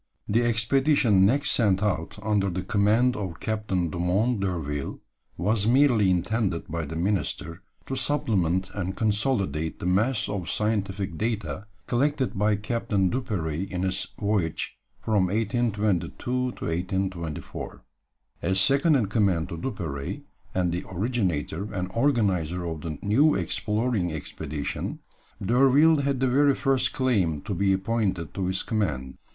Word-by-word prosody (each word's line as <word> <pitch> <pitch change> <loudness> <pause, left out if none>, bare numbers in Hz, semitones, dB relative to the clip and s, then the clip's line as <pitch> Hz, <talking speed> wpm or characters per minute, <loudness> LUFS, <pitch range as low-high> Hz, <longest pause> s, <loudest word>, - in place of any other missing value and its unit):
The 110 +3 +2
expedition 120 -3 +3
next 140 +6 +2
sent 100 -4 +2
out 90 -5 -1
under 105 -2 +1
the 90 +1 -3
command 110 +5 +2
of 95 -5 -5
Captain 105 -6 -1
Dumont 95 +8 +1
d'Urville 80 -7 -3 0.4
was 105 +4 +1
merely 120 -5 +4
intended 95 0 0
by 85 -1 -3
the 80 +2 -6
minister 90 -1 -2 0.2
to 135 - -3
supplement 95 - +1
and 95 -1 -3
consolidate 100 - 0
the - - -5
mass 105 +7 +2
of 100 -4 -3
scientific 100 -4 -1
data 110 -2 -2 0.2
collected 130 0 0
by 105 +2 +2
Captain 105 -3 0
Duperrey 95 - -2
in 90 -1 -2
his 95 0 -1
voyage 100 -6 -1 0.2
from 105 -4 +1
1822 105 -3 0
to 125 0 0 0.2
1824. 90 -1 -3 0.6
As 95 +3 +1
second 140 - +4
in 125 -6 +2
command 100 -5 +1
to 85 - -5
Duperrey, 75 - -4 0.3
and 90 -2 +1
the 85 +1 -2
originator 95 - -1
and 90 -2 -3
organizer 95 - +1
of 80 -2 -4
the 80 -2 -5
new 135 +10 +4
exploring 105 +1 0
expedition, 75 -1 -4 0.4
D'Urville 135 +8 +5
had 140 -2 0
the 130 - +2
very 140 +2 +4
first 135 -1 +2
claim 95 - +1
to 100 - -4
be 95 +2 +2
appointed 95 -4 -1
to 95 -2 -2
its 95 - -1
command. 70 - -2
100 Hz, 135 wpm, -26 LUFS, 90-115 Hz, 0.6 s, D'Urville